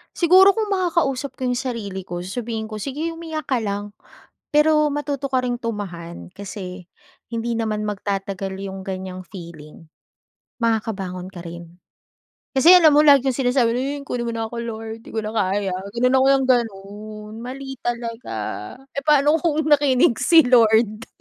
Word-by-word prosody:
Siguro 375 +3 +6
kung 435 -2 -2
makakausap 335 -8 0
ko - - -20
yung 245 - 0
sarili 220 -7 -4
ko 175 -1 -5
sasabihin 220 +3 -4
ko 215 - -6
sige 285 +9 -3
umiyak 325 -3 -6
ka 260 - +2
lang, 205 -1 -4 0.6
pero 305 0 +4
matuto 285 -1 -3
ka 260 -1 +1
ring 245 -1 -2
tumahan 195 -9 -6
kasi 185 -2 -7 0.5
hindi 230 0 -2
naman 215 -2 -1
magtatagal 195 -1 -3
yung 195 -1 -6
ganyang 185 -1 -6
feeling, 165 -4 -12 0.7
makakabangon 195 -5 -2
ka 175 - -8
rin, 170 +1 -10 0.7
kasi 330 +7 +8
alam 330 -4 +7
mo - - +6
lagi 280 -3 +6
yung - - -6
sinasabi 245 -2 +2
yun 280 +3 -3
"kunin 240 -1 -3
mo 235 - -1
na 225 - -2
ako 235 - -8
lord 225 -1 -6
di - - -12
ko 220 - -1
na 215 - -4
kaya", 195 -1 0 0.2
ganun 250 +2 +3
ako 260 - +3
yung 270 -1 +1
ganun, 210 -1 -4
mali 270 +3 -7
talaga 235 0 -4 0.6
eh - - 0
pa'no 295 +1 +4
kung 315 -1 0
nakinig 270 -5 +4
si 320 +6 +6
Lord. 225 -2 +3
230 Hz, 160 wpm, -22 LUFS, 200-275 Hz, 0.7 s, kasi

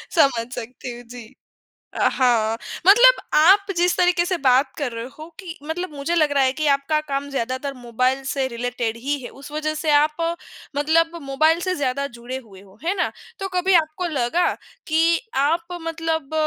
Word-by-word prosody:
समझ 245 -7 +3
सकती 245 +1 -7
हूँ। 245 - -11
जी। 235 -1 -12 0.6
अ, - - +2
हाँ 230 -3 +2 0.3
मतलब - - +8 0.2
आप 390 +5 +5
जिस 355 +1 +3
तरीके 355 -1 +3
से 365 +1 0
बात 260 +2 +4
कर 285 -5 -2
रहे 230 0 -5
हो 310 - -9
कि 355 -3 -8
मतलब 320 +1 -4
मुझे 300 +5 -2
लग 305 -3 +3
रहा 280 -1 +3
है 260 - +3
कि 305 - +1
आपका 280 +3 0
काम 275 0 -2
ज़्यादातर 265 +1 -3
मोबाइल 255 +2 0
से 270 0 -1
रिलेटेड 235 -2 -3
ही 280 +5 -2
है। - - -6
उस 275 +2 -12
वज़ह 310 0 -2
से 310 0 -2
आप 300 +1 +4 0.6
मतलब 330 +3 +2
मोबाइल 310 +5 +2
से 370 0 0
ज़्यादा 280 -2 -1
जुड़े 240 +1 -7
हुए 195 -3 -15
हो, 195 0 -19
है 360 +4 0
ना? 360 - 0 0.3
तो 390 - -2
कभी 365 +1 +2
आपको 315 +3 -6
लगा 295 +3 +1 0.4
कि 330 +1 +3 0.2
आप 335 +4 0
मतलब 325 -2 -3
290 Hz, 180 wpm, -22 LUFS, 255-330 Hz, 0.6 s, मतलब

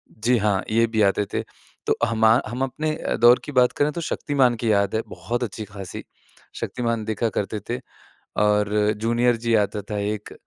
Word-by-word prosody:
जी 120 +3 +2
हाँ, 100 -2 +1
ये 115 +1 +4
भी 110 -1 0
आते 100 0 +3
थे। - - 0 0.5
तो - - +3
हमा 110 0 +4
हम 125 +4 -5
अपने 155 +4 -2
अ, - - -2
दौर 120 +2 +6
की 150 - -6
बात 125 -2 +4
करें 145 +1 +1
तो 170 - -5
शक्तिमान 135 -6 +1
की 115 -2 +2
याद 100 0 +2
है 110 - +1
बहुत 120 +1 -4
अच्छी-ख़ासी। 105 -3 -7 0.6
शक्तिमान 115 -3 -2
देखा 110 +1 -1
करते 105 +1 -2
थे 120 +2 -2 0.6
और 105 0 +3 0.3
जूनियर 120 +2 +2
जी 115 - +2
आता 105 0 0
था 105 - -2
एक। 105 0 -4
115 Hz, 185 wpm, -23 LUFS, 105-120 Hz, 0.6 s, दौर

